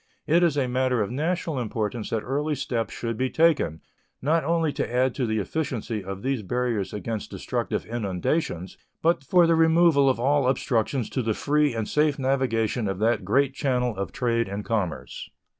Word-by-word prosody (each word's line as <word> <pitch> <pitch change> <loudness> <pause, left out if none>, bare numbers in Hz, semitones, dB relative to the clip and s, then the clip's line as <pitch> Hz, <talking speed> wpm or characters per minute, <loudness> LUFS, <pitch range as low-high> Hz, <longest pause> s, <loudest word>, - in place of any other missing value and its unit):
It 170 +3 +3
is 165 -4 +2
a 135 -3 +1
matter 125 -2 +1
of 100 - -5
national 160 +1 -1
importance 110 -1 -3
that 110 -2 -1
early 145 +4 -1
steps 115 -6 -2
should 115 -2 -4
be 130 +2 0
taken, 155 - +2 0.4
not 160 +4 +1
only 165 -1 +1
to - - -3
add 125 +1 +2
to 130 -4 -1
the 110 0 0
efficiency 115 - -3
of 95 +1 -7
these 135 -3 0
barriers 115 -1 -1
against 110 +1 -4
destructive - - -3
inundations, 100 - -2 0.2
but 165 -4 +2
for 175 +5 +4
the 165 - +4
removal 160 -3 +5
of 130 - 0
all 140 +1 +2
obstructions 125 -1 0
to 130 - -1
the 110 -2 -1
free 150 -3 +1
and 110 -2 -2
safe 150 -1 +2
navigation 125 -4 0
of 95 -1 -2
that 110 +1 +1
great 135 +8 +2
channel 125 -4 0
of 100 +1 -4
trade 115 -2 0
and 100 +1 -5
commerce. 100 -8 -3
125 Hz, 180 wpm, -25 LUFS, 110-145 Hz, 0.4 s, removal